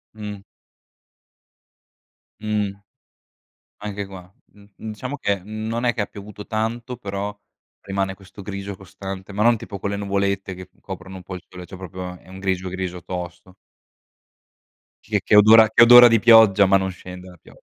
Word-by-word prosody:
Mh. 105 Hz, -2 st, -7 dB, 2.0 s
Mh. 105 Hz, -2 st, -1 dB, 1.1 s
Anche 100 Hz, -1 st, -5 dB
qua, 95 Hz, -1 st, -12 dB, 0.2 s
mhmm, 100 Hz, 0 st, -20 dB
diciamo 110 Hz, +6 st, -6 dB
che 100 Hz, -, 0 dB
è -, -, -19 dB
non 110 Hz, +3 st, -4 dB
è 120 Hz, -, +3 dB
che 120 Hz, -, -4 dB
ha -, -, -3 dB
piovuto 105 Hz, 0 st, -11 dB
tanto, 115 Hz, +3 st, -3 dB
però, 100 Hz, -2 st, -5 dB, 0.4 s
rimane 95 Hz, 0 st, -3 dB
questo 95 Hz, +1 st, -15 dB
grigio 100 Hz, 0 st, -6 dB
costante, 95 Hz, +1 st, -9 dB
ma 105 Hz, +2 st, -1 dB
non 120 Hz, +1 st, +5 dB
tipo 100 Hz, -, -8 dB
quelle 100 Hz, +1 st, -2 dB
nuvolette 100 Hz, -1 st, -2 dB
che 90 Hz, -1 st, -11 dB
coprono 95 Hz, 0 st, -9 dB
un 95 Hz, -, -10 dB
po' 95 Hz, -, -7 dB
il 90 Hz, -, -8 dB
sole, 90 Hz, -1 st, -10 dB
cioè 95 Hz, -, -10 dB
proprio 90 Hz, -1 st, -7 dB
è -, -, -22 dB
un 95 Hz, +1 st, -10 dB
grigio 95 Hz, -1 st, -2 dB
grigio 90 Hz, -1 st, -5 dB
tosto. 90 Hz, +1 st, -7 dB, 1.5 s
Che -, -, -1 dB
che -, -, +3 dB
odora 110 Hz, +1 st, +8 dB
che 115 Hz, +2 st, +6 dB
odora 120 Hz, +1 st, +10 dB
di 115 Hz, -1 st, +4 dB
pioggia 110 Hz, -3 st, +7 dB
ma 95 Hz, 0 st, +5 dB
non 95 Hz, 0 st, -2 dB
scende 90 Hz, 0 st, -11 dB
la 90 Hz, -, -15 dB
pioggia. -, -, -19 dB
100 Hz, 165 wpm, -22 LUFS, 95-110 Hz, 2.0 s, odora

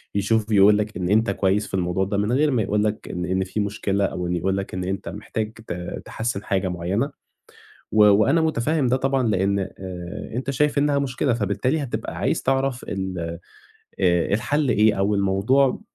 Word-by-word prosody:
يشوف 105 Hz, +2 st, +1 dB
ويقول 105 Hz, 0 st, +6 dB
لك 105 Hz, +1 st, -3 dB
إن 90 Hz, -1 st, -2 dB
أنت 110 Hz, 0 st, +3 dB
كويس 100 Hz, +1 st, +1 dB
في -, -, -15 dB
الموضوع 95 Hz, +1 st, 0 dB
ده 100 Hz, +1 st, -2 dB
من 105 Hz, +3 st, 0 dB
غير 145 Hz, +3 st, +3 dB
ما 120 Hz, -4 st, +1 dB
يقول 105 Hz, +1 st, 0 dB
لك 105 Hz, 0 st, -2 dB
إن 90 Hz, 0 st, -3 dB
إن 95 Hz, +1 st, 0 dB
في 95 Hz, +3 st, -4 dB
مشكلة 100 Hz, -1 st, 0 dB
أو 90 Hz, -1 st, -3 dB
إن 90 Hz, -, -1 dB
يقول 95 Hz, +3 st, 0 dB
لك 100 Hz, -, -5 dB
إن 90 Hz, -, -3 dB
أنت 95 Hz, +1 st, -3 dB
محتاج 110 Hz, +1 st, -4 dB
ت 90 Hz, -6 st, -6 dB
تحسّن 110 Hz, -3 st, -3 dB
حاجة 95 Hz, -1 st, 0 dB
معيّنة. 90 Hz, -, -1 dB, 0.8 s
و 105 Hz, -1 st, +6 dB
وأنا 105 Hz, +10 st, +5 dB
مُتفاهم 155 Hz, -2 st, +1 dB
ده 125 Hz, -, +2 dB
طبعًا، 135 Hz, -2 st, +1 dB
لإن 100 Hz, -1 st, +1 dB
آآ، 95 Hz, 0 st, -6 dB
أنت 130 Hz, +3 st, -2 dB
شايف 145 Hz, +2 st, +1 dB
إنّها 145 Hz, 0 st, +2 dB
مشكلة، 130 Hz, -1 st, 0 dB
فبالتالي 115 Hz, +8 st, 0 dB
هتبقى 135 Hz, -, -4 dB
عايز -, -, 0 dB
تعرف 135 Hz, -1 st, 0 dB
ال 95 Hz, -2 st, -3 dB, 0.8 s
آآ، 90 Hz, 0 st, +2 dB
الحَل 145 Hz, +6 st, 0 dB
إيه، 105 Hz, -1 st, +4 dB
أو 100 Hz, +2 st, +2 dB
الموضوع 100 Hz, +8 st, +2 dB
105 Hz, 190 wpm, -23 LUFS, 95-125 Hz, 0.8 s, ويقول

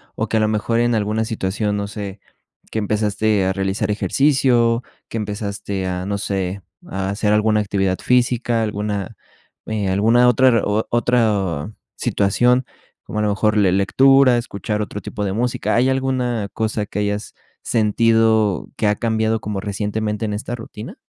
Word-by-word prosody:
o -, -, -2 dB
que, 110 Hz, -, +1 dB
a -, -, +3 dB
lo 110 Hz, -, +2 dB
mejor, 110 Hz, +2 st, 0 dB
en 120 Hz, 0 st, +2 dB
alguna 110 Hz, +1 st, 0 dB
situación, 105 Hz, -1 st, -2 dB
no 100 Hz, 0 st, -2 dB
sé, 100 Hz, -1 st, -7 dB, 0.5 s
que 110 Hz, -, -1 dB
empezaste 105 Hz, -1 st, +1 dB
a 95 Hz, -, +1 dB
realizar 95 Hz, +2 st, -1 dB
ejercicio, 120 Hz, -1 st, +2 dB, 0.3 s
que 115 Hz, -, -4 dB
empezaste 100 Hz, -2 st, -4 dB
a, 90 Hz, 0 st, -3 dB
no 100 Hz, 0 st, -2 dB
sé, 95 Hz, -1 st, -3 dB, 0.3 s
a 95 Hz, 0 st, -3 dB
hacer 105 Hz, +1 st, 0 dB
alguna 105 Hz, 0 st, +3 dB
actividad 95 Hz, -2 st, 0 dB
física, 120 Hz, -2 st, +1 dB
alguna, 105 Hz, -2 st, -3 dB, 0.5 s
eh, 105 Hz, -3 st, -2 dB
alguna 115 Hz, +6 st, +4 dB
otra 130 Hz, +2 st, +4 dB
re 115 Hz, -3 st, +3 dB
otra 105 Hz, -6 st, 0 dB, 0.3 s
situación, 120 Hz, +6 st, +2 dB, 0.4 s
como 105 Hz, -, -5 dB
a -, -, +1 dB
lo -, -, +1 dB
mejor 105 Hz, +1 st, +1 dB
le 100 Hz, -3 st, +4 dB
lectura, 130 Hz, +6 st, +5 dB
escuchar 105 Hz, -2 st, -3 dB
otro 105 Hz, 0 st, -5 dB
tipo 105 Hz, -, -4 dB
de 95 Hz, -, -2 dB
música, 120 Hz, +3 st, -1 dB
¿hay 125 Hz, +3 st, +3 dB
alguna 125 Hz, -5 st, -1 dB
cosa 110 Hz, -1 st, -1 dB
que 100 Hz, -, -5 dB
hayas 105 Hz, +1 st, -2 dB, 0.3 s
sentido 110 Hz, -3 st, +2 dB
que -, -, -1 dB
ha 105 Hz, -, +2 dB
cambiado 110 Hz, 0 st, 0 dB
como 105 Hz, -1 st, -3 dB
recientemente 105 Hz, +2 st, -2 dB
en 105 Hz, -, -2 dB
esta 105 Hz, +3 st, -4 dB
rutina? 115 Hz, -, -9 dB
105 Hz, 160 wpm, -20 LUFS, 100-115 Hz, 0.5 s, lectura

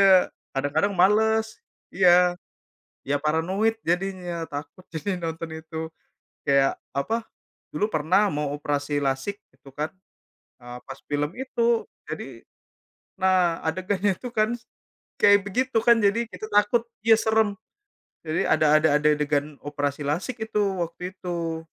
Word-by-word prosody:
Jadinya 190 Hz, -1 st, +6 dB, 0.2 s
kadang-kadang 145 Hz, +9 st, 0 dB
males, 220 Hz, +4 st, +3 dB, 0.3 s
iya. 180 Hz, -1 st, +5 dB, 0.7 s
Ya, 145 Hz, +1 st, +2 dB
paranoid 190 Hz, +9 st, +1 dB
jadinya, 180 Hz, -1 st, -1 dB
takut 145 Hz, +5 st, -7 dB
jadinya 170 Hz, 0 st, -2 dB
nonton 165 Hz, 0 st, -7 dB
itu. 160 Hz, 0 st, -5 dB, 0.6 s
Kayak 140 Hz, 0 st, +3 dB, 0.2 s
apa, 220 Hz, -, -1 dB, 0.5 s
dulu 210 Hz, -, +1 dB
pernah 185 Hz, +3 st, +2 dB
mau 150 Hz, -4 st, -2 dB
operasi 145 Hz, 0 st, -1 dB
lasik 140 Hz, +9 st, -1 dB, 0.2 s
gitu, 135 Hz, -, -16 dB
kan, 150 Hz, +3 st, -2 dB, 0.7 s
eee, 120 Hz, 0 st, -9 dB
pas 135 Hz, 0 st, -9 dB
film 145 Hz, +1 st, -1 dB
itu. 235 Hz, -3 st, +1 dB, 0.2 s
Jadi, -, -, -7 dB, 0.7 s
nah 185 Hz, -3 st, +3 dB
adegannya 185 Hz, +4 st, 0 dB
itu, 250 Hz, -, -6 dB
kan, 215 Hz, +2 st, +2 dB, 0.7 s
kayak 200 Hz, 0 st, +6 dB
begitu, 250 Hz, +4 st, 0 dB
kan, 235 Hz, -1 st, +6 dB
jadi 205 Hz, +3 st, +3 dB
kita 215 Hz, -, -7 dB
takut 210 Hz, +3 st, +3 dB, 0.2 s
iya, 225 Hz, 0 st, +7 dB
serem. 220 Hz, -1 st, +2 dB, 0.7 s
Jadi 155 Hz, 0 st, 0 dB
ada 155 Hz, 0 st, +3 dB
ada 160 Hz, +1 st, +3 dB
ade 150 Hz, 0 st, +3 dB
adegan 145 Hz, 0 st, 0 dB
operasi 145 Hz, 0 st, -2 dB
lasik 180 Hz, -, -2 dB
itu 220 Hz, -1 st, -2 dB, 0.2 s
waktu 180 Hz, +3 st, -7 dB
itu. 165 Hz, -3 st, -3 dB
175 Hz, 130 wpm, -25 LUFS, 150-205 Hz, 0.7 s, iya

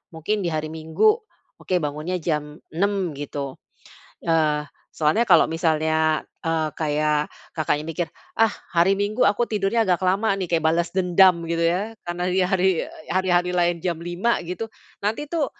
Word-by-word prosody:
mungkin 205 Hz, +7 st, -1 dB
di 175 Hz, -, -1 dB
hari 155 Hz, -1 st, -3 dB
Minggu, 160 Hz, -, +2 dB, 0.5 s
oke, 185 Hz, -, -2 dB
bangunnya 155 Hz, +2 st, -2 dB
jam 150 Hz, -2 st, -2 dB, 0.2 s
6.00, 190 Hz, 0 st, 0 dB
gitu. 140 Hz, -1 st, -6 dB, 0.7 s
Eee, 155 Hz, -3 st, +2 dB, 0.3 s
soalnya 160 Hz, +10 st, +2 dB
kalau 170 Hz, -5 st, +6 dB
misalnya, 160 Hz, -1 st, +1 dB, 0.2 s
eee, 160 Hz, -1 st, 0 dB
kayak 150 Hz, -1 st, 0 dB, 0.3 s
Kakaknya 150 Hz, -1 st, 0 dB
mikir, 165 Hz, +1 st, -2 dB, 0.3 s
"Ah, 225 Hz, -1 st, +4 dB, 0.3 s
hari 175 Hz, +3 st, +5 dB
Minggu 210 Hz, +4 st, 0 dB
aku 205 Hz, +4 st, +2 dB
tidurnya 215 Hz, +1 st, +1 dB
agak 180 Hz, 0 st, +2 dB
lama, 195 Hz, +3 st, +2 dB
nih," 185 Hz, -3 st, -3 dB
kayak 165 Hz, -2 st, +2 dB
balas 170 Hz, +1 st, +1 dB
dendam, 185 Hz, -1 st, +4 dB
gitu 170 Hz, 0 st, 0 dB
ya, 190 Hz, +7 st, 0 dB
karena 175 Hz, +1 st, -3 dB
di 185 Hz, +1 st, +1 dB
hari 185 Hz, -1 st, +2 dB
e -, -, -10 dB, 0.2 s
hari-hari 180 Hz, -1 st, +2 dB
lain 175 Hz, 0 st, +2 dB
jam 175 Hz, -1 st, -1 dB
5.00, 175 Hz, +7 st, 0 dB
gitu, 180 Hz, +6 st, -4 dB, 0.3 s
nanti 215 Hz, +8 st, -1 dB
tuh, 325 Hz, -4 st, +1 dB
175 Hz, 160 wpm, -23 LUFS, 155-190 Hz, 0.7 s, kalau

